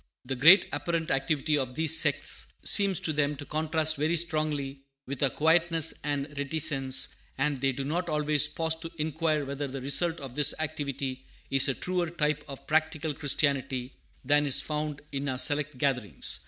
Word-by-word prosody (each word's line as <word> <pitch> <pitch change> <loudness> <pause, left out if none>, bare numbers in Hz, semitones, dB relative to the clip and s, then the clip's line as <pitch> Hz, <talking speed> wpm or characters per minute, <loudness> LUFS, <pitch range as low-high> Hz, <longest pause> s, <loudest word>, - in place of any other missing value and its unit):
The 135 +1 -3
great 165 +10 +7
apparent 165 -2 -2
activity 140 +3 0
of 125 -2 -4
these 160 +1 +3
sects 145 -1 +1
seems 200 -3 +4
to 155 - 0
them 145 0 0
to 145 - -9
contrast 155 0 0
very 155 +4 +1
strongly 155 -4 -1 0.2
with 135 -1 -6
our 140 - +3
quietness 165 +2 +2
and 145 -2 -1
reticence; 140 -2 +1 0.3
and 135 -1 -1
they 135 0 +2
do 135 +1 -5
not 170 +5 -2
always 150 -1 +2
pause 160 -1 -1
to 165 0 -7
inquire 155 -1 -1
whether 140 +1 -4
the 135 0 -6
result 160 +6 +1
of 135 -4 -8
this 145 +1 +3
activity 140 -4 -4 0.2
is 135 +1 +5
a 135 - 0
truer 180 -2 -2
type 150 -3 -1
of 140 -2 -10
practical 155 0 0
Christianity 135 -3 -1 0.3
than 145 +2 +3
is 135 - +3
found 150 -1 -4
in 140 0 -3
our 130 - -2
select 145 0 0
gatherings. 125 - 0
150 Hz, 170 wpm, -28 LUFS, 135-160 Hz, 0.3 s, great